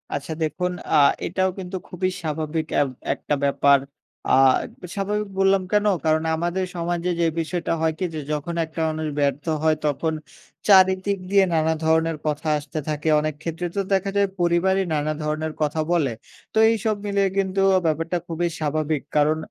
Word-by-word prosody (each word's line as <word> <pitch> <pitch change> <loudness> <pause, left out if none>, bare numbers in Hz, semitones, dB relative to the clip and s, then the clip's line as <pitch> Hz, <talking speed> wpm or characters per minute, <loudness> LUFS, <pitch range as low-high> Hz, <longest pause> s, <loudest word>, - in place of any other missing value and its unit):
আচ্ছা। 145 +3 -4
দেখুন 180 +4 -1 0.2
আ - - +5 0.3
এটাও 185 +2 0
কিন্তু 185 0 -6
খুবই 185 +1 -1
স্বাভাবিক 155 0 -2 0.2
এব 140 - +1 0.2
একটা 145 - -2
ব্যাপার। 140 0 +4 0.5
আ - - +2 0.5
তো - - -7
স্বাভাবিক 210 +1 -1
বললাম 195 0 +4
কেন? 210 0 +2 0.2
কারণ 155 0 +2
আমাদের 175 +3 -1
সমাজে 175 +1 -2
যে 170 - +3
বিষয়টা 165 +1 -2
হয় 160 -1 +2
কি 185 - 0
যে - - -3
যখন 155 +3 -3
একটা 160 +1 -9
মানুষ 155 0 -3
ব্যর্থ 140 0 0 0.2
হয়। 160 -1 +4
তখন 150 +2 0 0.5
চারিদিক 190 0 +5
দিয়ে 195 0 +5
নানা 160 0 +2
ধরনের 160 0 +2
কথা 150 +1 -2
আসতে 150 +1 -5
থাকে। 150 +1 -3
অনেক 155 0 -1
ক্ষেত্রে 165 +2 -4
তো 200 - +1
দেখা 195 +1 +1
যায় 200 - +4
পরিবারই 175 +3 +2
নানা 150 0 0
ধরনের 155 +1 -2
কথা 150 +1 0
বলে। 155 -8 +2 0.4
তো - - -2
এইসব 220 -1 0
মিলে 200 0 +1 0.2
কিন্তু 195 0 +1 0.2
ব্যাপারটা 165 +2 0
খুবই 175 +1 -1
স্বাভাবিক। 155 -1 -1
কারণ 150 +1 +3
165 Hz, 165 wpm, -23 LUFS, 155-185 Hz, 0.5 s, আ